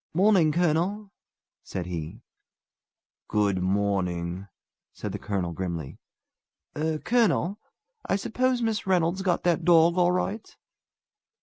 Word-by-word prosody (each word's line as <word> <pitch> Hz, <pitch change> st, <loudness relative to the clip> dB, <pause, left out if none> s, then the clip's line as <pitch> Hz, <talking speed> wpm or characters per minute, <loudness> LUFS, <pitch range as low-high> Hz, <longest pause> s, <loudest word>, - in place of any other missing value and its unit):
"Morning, 185 Hz, -4 st, +4 dB
colonel!" 175 Hz, +5 st, 0 dB, 0.5 s
said 90 Hz, -2 st, -5 dB
he. 90 Hz, +5 st, -6 dB, 1.0 s
"Good 100 Hz, -3 st, +1 dB
morning!" 95 Hz, -2 st, -1 dB, 0.5 s
said -, -, -5 dB
the -, -, -5 dB
colonel 95 Hz, -4 st, -2 dB
grimly. 85 Hz, -5 st, -5 dB, 0.8 s
"Er 155 Hz, +1 st, -1 dB
colonel, 205 Hz, -2 st, +1 dB, 0.5 s
I -, -, +3 dB
er -, -, +1 dB
suppose 250 Hz, +4 st, 0 dB
Miss 220 Hz, -3 st, -1 dB
Reynolds 180 Hz, 0 st, +1 dB
got 185 Hz, -3 st, 0 dB
that 175 Hz, -1 st, +1 dB
dog 170 Hz, +1 st, +5 dB
all 175 Hz, 0 st, +4 dB
right?" 200 Hz, +4 st, -3 dB
165 Hz, 115 wpm, -26 LUFS, -, 1.0 s, dog